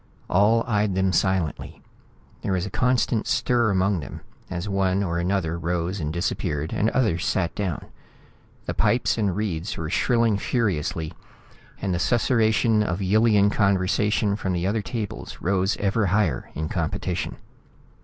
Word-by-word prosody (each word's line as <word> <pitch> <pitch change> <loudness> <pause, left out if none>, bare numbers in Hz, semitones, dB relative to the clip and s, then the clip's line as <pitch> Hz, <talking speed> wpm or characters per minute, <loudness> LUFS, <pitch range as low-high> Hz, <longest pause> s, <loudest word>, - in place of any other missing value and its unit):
All 110 +5 +4
eyed 105 -4 0
them 95 -1 +1
silently. 95 -3 -1 0.6
There 95 - -1
was 90 0 0
a 100 - -6
constant 125 -2 +1
stir 120 -2 +2
among 95 -1 +1
them 75 - -8 0.3
as 90 +2 -4
one 95 -1 +1
or 85 -2 -1
another 85 -2 -1
rose 85 +3 -2
and 75 -2 -2
disappeared 80 -3 -2
and 110 - +2
others 105 -10 +1
sat 95 -3 0
down. 95 -7 -3 0.8
The - - -2
pipes 120 -1 +1
and 100 -4 +1
reeds 95 -3 -3
were 80 -1 -4
shrilling 115 -4 +2
furiously, 85 - -1 0.7
and 95 -2 -1
the 85 - -1
susurration 115 -1 +2
of 90 -4 -1
Yillian 105 +1 +3
conversation 100 +1 +1
from 95 -3 -2
the 85 0 -1
other 105 +3 0
tables 105 0 -5
rose 95 +1 +1
ever 100 +1 +1
higher 90 - 0
in 80 +1 -2
competition. 80 -2 -2
95 Hz, 145 wpm, -24 LUFS, 85-105 Hz, 0.8 s, All